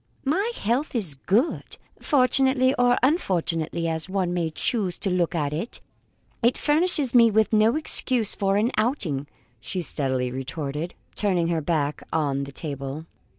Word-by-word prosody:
"My 385 - 0
health 250 +7 -1
is 190 -11 +1
good. 200 - -1 0.2
Fortunately, 260 -1 +3
or 245 -1 +3
unfortunately, 170 - 0
as 160 +2 -3
one 185 -2 -1
may 170 -2 -1
choose 185 +3 -1
to 195 - -2
look 175 -1 0
at 150 -3 -1
it, 170 +10 -4 0.6
it 240 +1 +2
furnishes 300 -4 +2
me 235 -2 +6
with 220 0 +1
no 220 +3 +4
excuse 255 -7 +3
for 195 0 0
an 225 +4 +1
outing," 190 - -1 0.3
she 125 - -4
steadily 130 -5 0
retorted, 140 +5 -5 0.2
turning 180 -5 0
her 165 -2 0
back 150 -2 -1
on 140 -3 -1
the 140 - -10
table. 140 +1 -6
185 Hz, 150 wpm, -24 LUFS, 155-245 Hz, 0.6 s, me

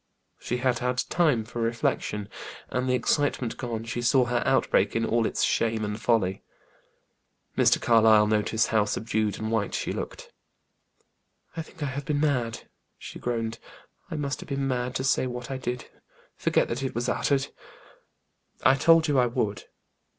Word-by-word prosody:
She 125 - -2
had 125 -1 +1
had 125 +1 -1
time 150 -10 +2
for 120 +1 -5
reflection, 115 -3 -1 0.4
and 125 0 -1
the 125 - +3
excitement 130 -3 0
gone, 115 -3 -4
she 115 +1 -4
saw 125 +2 +4
her 120 0 0
outbreak - - +2
in 115 0 +1
all 115 0 +2
its - - -1
shame 110 -1 +1
and 105 +1 -4
folly. 105 -4 +1 1.1
Mr. - - +4
Carlyle 110 -2 +5
noticed 110 +1 +1
how 110 -2 +3
subdued 110 0 -1
and 110 0 -3
white 110 -2 0
she - - -2
looked. - - -6 1.2
"I 165 - -3
think 160 -1 -9
I 135 -2 -2
have 140 0 -5
been 145 0 0
mad," 125 -6 0 0.3
she - - -9
groaned. 115 -2 -2 0.5
"I - - -4
must 140 -3 -2
have - - -10
been 140 0 -1
mad 125 -1 -2
to 130 - -1
say 130 -1 +2
what 125 +1 -6
I 135 - -2
did. 125 -1 -4 0.5
Forget - - +1
that 120 +3 -2
it 135 -3 -3
was 120 +1 -1
uttered." 140 +1 +1 1.1
"I 130 - +6
told 165 +3 +5
you 145 -3 +3
I 125 - +4
would." 110 -5 -2
120 Hz, 170 wpm, -26 LUFS, 110-135 Hz, 1.2 s, I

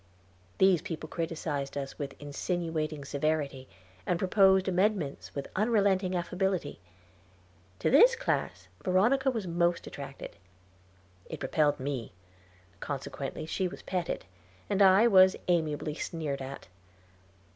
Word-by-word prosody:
These 190 -4 +4
people 160 -2 -6
criticised 155 -4 -3
us 135 -1 -5
with 140 -2 -6
insinuating 155 0 -3
severity, 140 -2 -2 0.4
and 175 - 0
proposed 190 +1 +4
amendments 190 -5 0
with 140 - -4
unrelenting 200 -3 +2
affability. 180 -2 -2 1.0
To - - 0
this 475 - +7
class - - -2 0.2
Veronica 235 +9 +3
was 225 -6 -2
most 170 0 0
attracted 140 -1 -8 1.0
it - - -6
repelled 145 +2 +2
me; 130 -6 -4 0.7
consequently 140 +2 -5
she 185 +3 -1
was 180 - -10
petted, 180 -2 -3 0.5
and 200 0 +2
I 195 +3 +7
was 190 -4 +6
amiably 155 -3 0
sneered 150 -3 -4
at. 135 +1 -7
170 Hz, 115 wpm, -29 LUFS, 145-190 Hz, 1.0 s, this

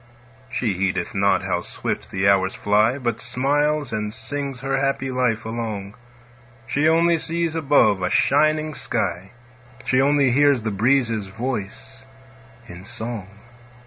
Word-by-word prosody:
She 115 -5 -1
heedeth 90 -1 -2
not 100 0 +2
how - - -1
swift - - -5
the 95 0 0
hours 95 -1 +3
fly, 105 +5 +2
But 120 -4 -3
smiles 145 +3 0
and 105 -1 -2
sings 135 +4 -5
her 135 0 -1
happy 135 -1 -1
life 125 -3 0
along; 110 -3 -4 0.7
She 145 +4 +2
only 165 +1 +3
sees 165 0 -2
above 140 -10 +3
a 90 - 0
shining 155 +5 +2
sky; 95 -8 -3 0.6
She 130 +1 +3
only 140 -1 +3
hears 140 -2 +3
the 110 - -1
breezes' 115 -1 +1
voice 105 - -6 0.7
in 90 +1 -10
song. 115 -2 -6
120 Hz, 135 wpm, -22 LUFS, 105-140 Hz, 0.7 s, hours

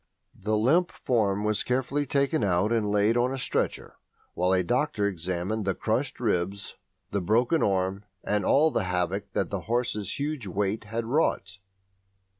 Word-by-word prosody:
The 105 +2 -1
limp 160 +11 +3
form 105 -5 0
was 105 -1 +1
carefully 130 +3 -1
taken 140 0 +1
out 95 +2 +2
and 110 -3 +1
laid 105 +2 +3
on 125 +1 +2
a 135 - -3
stretcher 125 - -2 0.4
while 90 +1 +1
a 95 -1 +3
doctor 125 - 0
examined 95 +3 -2
the 95 -1 0
crushed 125 +5 -1
ribs, 100 -3 -1 0.4
the 100 - 0
broken 120 - +2
arm, 95 +1 0 0.2
and 105 0 0
all 155 +3 +4
the 105 - 0
havoc 90 +3 -2
that - - -1
the 100 - -1
horse's 115 -5 -1
huge 145 -6 -3
weight 100 +3 -1
had 115 +2 -3
wrought. 110 -7 0
105 Hz, 160 wpm, -27 LUFS, 95-125 Hz, 0.4 s, all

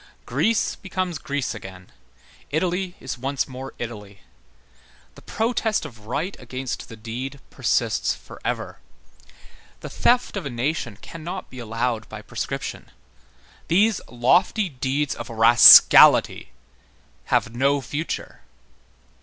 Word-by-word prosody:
Greece 230 0 0
becomes 185 -4 -4
Greece 140 -2 -3
again, 95 -4 -11 0.6
Italy 180 +4 -2
is 125 -2 -6
once 135 +2 -2
more 130 0 -9
Italy. 105 -4 -8 0.9
The - - -16
protest 225 -3 -1
of 115 -7 -12
right 150 - -3
against 130 +1 -6
the 115 - -9
deed 120 +5 -7
persists - - 0
forever. - - -6 1.0
The - - -8
theft 245 -2 +1
of 195 - -4
a - - -4
nation 120 -3 -3
cannot 175 +3 -8
be 130 - -10
allowed 115 0 -3
by - - -9
prescription. - - -6 0.8
These 205 +4 +2
lofty 175 - +2
deeds 135 +1 -2
of - - -8
rascality 115 +1 +7 0.8
have 120 - 0
no 140 +3 +2
future. 145 +4 -5
135 Hz, 110 wpm, -23 LUFS, 120-175 Hz, 1.0 s, rascality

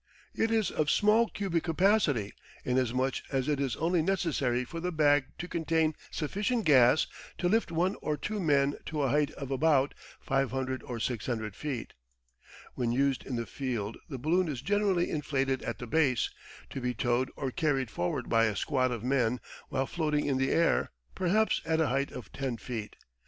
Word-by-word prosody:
It 225 - +1
is 220 -3 +1
of 150 -1 0
small 215 +5 +4
cubic 185 -5 -1
capacity, 165 - +2 0.3
inasmuch 130 +1 +1
as 135 -2 0
it 145 -2 +1
is 135 -4 0
only 170 +1 +1
necessary 150 -9 0
for 165 +7 -6
the 180 +2 -2
bag 145 -3 +4
to 175 - -5
contain 160 -2 +1 0.2
sufficient 205 - -1
gas 135 -1 +6 0.3
to 175 - 0
lift 220 0 +2
one 175 +4 +1
or 150 -1 -1
two 210 +8 -3
men 145 -5 +2
to 150 -3 -1
a 135 - +2
height 145 +2 +2
of 140 -1 -7
about 140 0 +3 0.3
500 130 -1 -1
or 120 -2 -6
600 110 -3 -2
feet. 135 -6 -4 0.8
When 120 -2 -1
used 135 +1 +1
in 130 - -3
the 115 0 -2
field 115 -5 -3
the 135 - -4
balloon 170 +8 +1
is 135 -4 -4
generally 200 -1 +2
inflated 135 -3 0
at - - -4
the 125 - -6
base, 130 0 +2 0.4
to 135 - -5
be 125 0 -1
towed 120 +2 +1
or 135 -3 -3
carried 135 -5 0
forward 90 0 -2
by 115 0 +4
a 110 -2 0
squad 130 +3 +1
of 120 -3 -4
men 125 -2 +1 0.3
while 135 - 0
floating 150 -1 0
in 135 -2 +1
the 135 0 +1
air, 165 0 +2 0.2
perhaps 210 +5 +2
at 160 0 0
a 160 - +2
height 135 +2 0
of 125 - -9
10 130 -4 -3
feet. 110 -1 -6
140 Hz, 180 wpm, -30 LUFS, 125-165 Hz, 0.8 s, gas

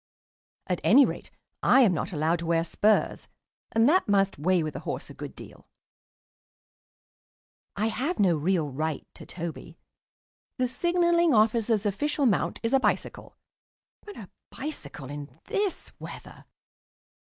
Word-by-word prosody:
At 180 -2 -2
any 270 +5 +7
rate - - -6 0.3
I 265 - +5
am 215 -7 +5
not 170 +4 -3
allowed 160 +1 0
to 170 - -5
wear 165 -1 +2
spurs, 210 +5 +1 0.4
and 225 +2 +3
that 365 +6 +3
must 195 -4 +2
weigh 180 +2 +2
with 155 - -5
a - - -4
horse - - -5
a - - -10
good - - -8
deal. - - -13 2.1
I 210 - 0
have 265 +10 -1
no 185 -5 +3
real 160 -1 0
right 155 +2 -3
to - - -12
Toby. 170 -2 -7 0.8
The 255 - +1
Signalling 345 +1 +2
Officer's 220 0 +2
official 285 +8 0
mount 215 -7 +1
is 230 - -1
a 270 - +5
bicycle, - - -2 0.7
but 415 -1 -11
a 200 - -10 0.2
bicycle 145 - -7
in 145 -1 -9
this 400 -2 -2
weather - - -10
205 Hz, 140 wpm, -27 LUFS, 165-265 Hz, 2.1 s, any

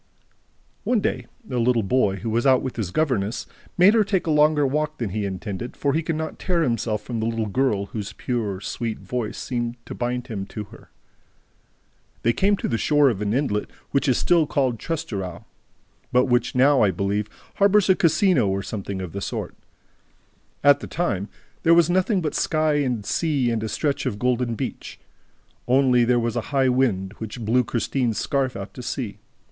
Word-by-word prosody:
One 245 -3 +2
day, - - -2 0.2
a 125 - -1
little 120 -1 +2
boy, 100 -1 +2
who 115 - -3
was 120 +4 +1
out 130 -1 +4
with 130 - -4
his 110 -6 -3
governess, 115 - -1 0.3
made 185 +4 +7
her 225 -2 +4
take 195 -2 0
a 160 - 0
longer 150 -1 +4
walk 150 +3 -1
than 115 -6 -3
he 105 +1 -2
intended, 100 +4 -5
for 140 -1 0
he 160 - +1
could 165 0 -2
not 160 0 -4
tear 175 -3 +1
himself 115 -5 -1
from 120 -2 -4
the 110 - -1
little 115 -1 -1
girl 105 -2 0
whose 105 0 -6
pure, 110 -6 -3
sweet 110 +2 -3
voice 120 -4 -4
seemed 120 -1 -3
to - - -7
bind 125 0 -2
him 100 -6 -5
to 105 - -6
her. 100 - -16 1.3
They 115 - +3
came 200 - +2
to - - -3
the 115 - -1
shore 145 -3 +4
of 105 -3 -5
an 105 -1 0
inlet 120 -4 0 0.2
which 140 +1 +1
is 130 - +3
still 170 -3 +3
called 130 -6 0
Trestraou, 105 - -4 0.7
but 125 +1 +4
which 120 -2 +1
now, 135 +2 +5
I 105 - +5
believe, 100 +3 -1 0.3
harbors 200 0 +4
a 190 - +6
casino 165 - +3
or 95 0 -1
something 100 -2 -5
of 90 - -6
the 100 - -5
sort. - - -4 1.1
At 145 0 +6
that - - -8
time, 110 - -1 0.3
there 165 +1 +5
was 170 0 +4
nothing 185 +2 +2
but 155 - -2
sky 155 -2 +1
and 125 -7 -1
sea 140 -6 0
and 115 -1 -1
a 110 - -3
stretch 140 0 -1
of 110 -5 -2
golden 125 0 0
beach. - - -6 0.7
Only, 125 -1 +4
there 125 +1 +3
was 115 -1 -1
also 120 - -3
a - - -11
high 135 -2 +2
wind, 110 -7 +1
which 110 +1 -6
blew 125 +4 +3
Christine's 120 0 -1
scarf 135 -2 0
out 100 0 -7
to - - -8
sea. 120 -3 -4
125 Hz, 195 wpm, -23 LUFS, 110-145 Hz, 1.3 s, made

